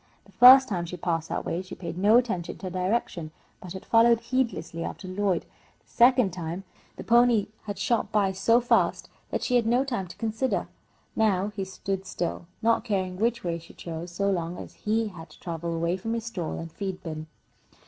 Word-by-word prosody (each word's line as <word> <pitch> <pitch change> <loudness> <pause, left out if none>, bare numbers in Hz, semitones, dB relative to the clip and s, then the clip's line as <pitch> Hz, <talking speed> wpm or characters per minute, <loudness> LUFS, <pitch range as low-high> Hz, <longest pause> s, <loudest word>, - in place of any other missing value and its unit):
The - - -20
first 260 +2 +9
time 175 -4 -2
she 180 - -6
passed 165 -2 -2
that - - -3
way 170 - -2
she 185 0 -9
had - - -26
paid 170 -3 -5
no 205 +5 +5
attention 215 -9 -1
to 185 -2 -6
direction, 185 -3 -1 0.3
but 180 -1 -8
had 190 - -8
followed 230 0 +5
heedlessly 230 -9 -2
after 190 - -6
Lloyd. 185 -2 0 0.4
The - - -39
second 245 -5 +4
time 175 +1 -5 0.3
the - - -8
pony 235 -3 +4 0.2
had 205 -2 -5
shot 215 +1 0
by 205 -3 +2
so 210 +5 +3
fast 240 - +1 0.2
that - - -2
she 250 - +3
had 235 - +1
had - - +1
no 250 +2 +3
time 235 -9 -3
to 175 - -12
consider. 225 +3 -1 0.5
Now 205 -3 +2
he 210 -2 -4
stood 190 0 -4
still, 175 0 -3 0.2
not 230 -1 +3
caring 190 -5 -2
which 235 +3 0
way 170 -1 -2
she 165 - -16
chose 170 +1 -6
so 200 +3 0
long 170 -1 -2
as - - -9
he 220 +1 -1
had 165 -4 -11
to 155 - -17
travel 170 -1 -4
away 170 +2 0
from 225 +5 -3
his 230 -1 -4
stall 185 -9 -4
and 165 0 -7
feed 190 0 -5
bin. 155 -1 -6
195 Hz, 210 wpm, -27 LUFS, 175-230 Hz, 0.5 s, first